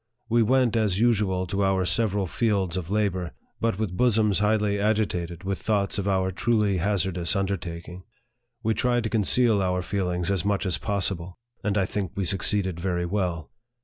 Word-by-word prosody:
We 115 +1 +3
went, 125 +1 +3
as 105 -4 +1
usual, 100 -6 +2
to 100 +3 -1
our 95 -1 +2
several 105 -1 +1
fields 95 -2 0
of 90 -2 -4
labor, 95 -5 -1 0.3
but 115 -4 0
with 105 -4 -2
bosoms 110 -4 +3
highly 105 -1 +1
agitated 95 -5 -1
with 95 +1 -3
thoughts 100 -2 0
of 100 - -2
our 95 -1 +1
truly 105 0 +1
hazardous 90 -1 0
under 100 0 0
taking. 85 0 -8 0.6
We 110 0 +2
tried 120 0 +1
to 110 - -3
conceal 110 0 +2
our 90 -1 0
feelings 90 -2 -1
as 95 -4 0
much 100 0 0
as 95 - 0
possible; 95 -4 -2 0.3
and 105 0 0
I 95 - +2
think 95 -2 -3
we 100 - -1
succeeded 95 0 +1
very 90 -1 -1
well. 90 -4 -2
100 Hz, 175 wpm, -25 LUFS, 90-105 Hz, 0.6 s, We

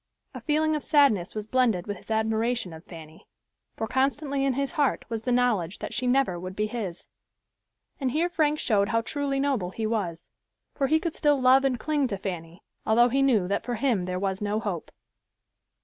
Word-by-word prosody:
A - - -8
feeling 310 0 +1
of 300 - -2
sadness 270 - +3
was 215 -1 -4
blended 225 -6 +1
with 205 -2 -4
his - - -18
admiration 220 -2 0
of 160 +1 -11
Fanny, 160 -2 -12 0.5
for 225 - -2
constantly 275 +3 0
in 275 -1 +2
his 275 +1 -1
heart 290 -3 0
was 225 -2 -3
the 250 - -2
knowledge 225 -8 +1
that - - -6
she 255 - -1
never 245 -9 +2
would 185 +1 -7
be 210 - 0
his. 210 -6 -5 0.9
And 265 -3 0
here 315 +7 +1
Frank 305 -3 +1
showed 205 -7 +1
how 230 0 +2
truly 275 +3 -2
noble 270 -10 0
he 220 +4 -4
was, 200 -7 -3 0.4
for 275 - 0
he 315 +3 +3
could 335 -1 -3
still 290 -2 +2
love 260 +1 +5
and 260 -3 0
cling 295 -1 0
to 200 -5 -3
Fanny, 175 -2 -6 0.2
although 240 +3 +4
he 270 +3 +1
knew 230 -9 +3
that 200 - -1
for 245 - -3
him 225 -6 0
there 180 0 -3
was 190 +1 -2
no 210 +1 0
hope. 200 -7 -4
230 Hz, 200 wpm, -26 LUFS, 200-275 Hz, 0.9 s, love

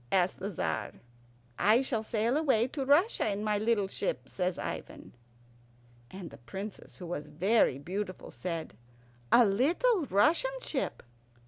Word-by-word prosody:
asked 185 -1 +2
the 195 +2 -3
Tzar. 85 - -2 0.7
"I 225 +5 +5
shall 235 -4 -1
sail 220 +3 0
away 270 -7 +3
to 275 -1 -3
Russia 305 - +3
in 205 +1 -2
my 210 -1 +1
little 215 -2 +1
ship," - - -3
says 180 -1 -2
Ivan. - - -6 1.0
And 185 -3 -8
the - - -13
Princess, 195 - -8
who 180 - -8
was 150 -3 -5
very 185 - +3
beautiful, 185 +6 -5
said, 165 - -5 0.6
"A 240 - +7
little 320 - +2
Russian 340 - +2
ship?" 295 - -3
210 Hz, 140 wpm, -30 LUFS, 185-265 Hz, 1.0 s, A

